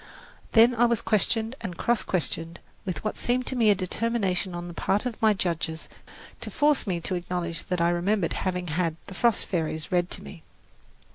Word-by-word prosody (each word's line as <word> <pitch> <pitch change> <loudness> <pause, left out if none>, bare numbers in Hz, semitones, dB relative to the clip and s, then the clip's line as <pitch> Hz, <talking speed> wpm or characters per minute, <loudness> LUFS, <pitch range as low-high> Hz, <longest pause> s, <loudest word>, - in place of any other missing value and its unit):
Then 230 +2 +7
I 240 0 +4
was 235 -2 +2
questioned 225 +2 +1
and 180 -6 -5
cross 240 -1 +2
questioned 165 -1 -1 0.3
with 185 -3 -4
what 215 - -2
seemed 250 +1 0
to 260 - -2
me 230 -3 +4
a 205 - +6
determination 190 -1 -1
on 175 0 -5
the 175 - -7
part 200 +6 0
of 245 -3 -4
my 215 -1 +5
judges 165 -3 -2 0.5
to - - -5
force 295 -5 +2
me 180 -3 0
to 185 - -3
acknowledge 175 -1 -2
that 180 -2 -1
I 170 - +4
remembered 180 +1 +1
having 180 -1 -2
had 165 0 0
"The 195 - -9
Frost 235 +3 +2
Fairies" 160 -3 -2
read 175 0 +2
to - - -5
me. 165 - -10
185 Hz, 195 wpm, -26 LUFS, 175-225 Hz, 0.5 s, Then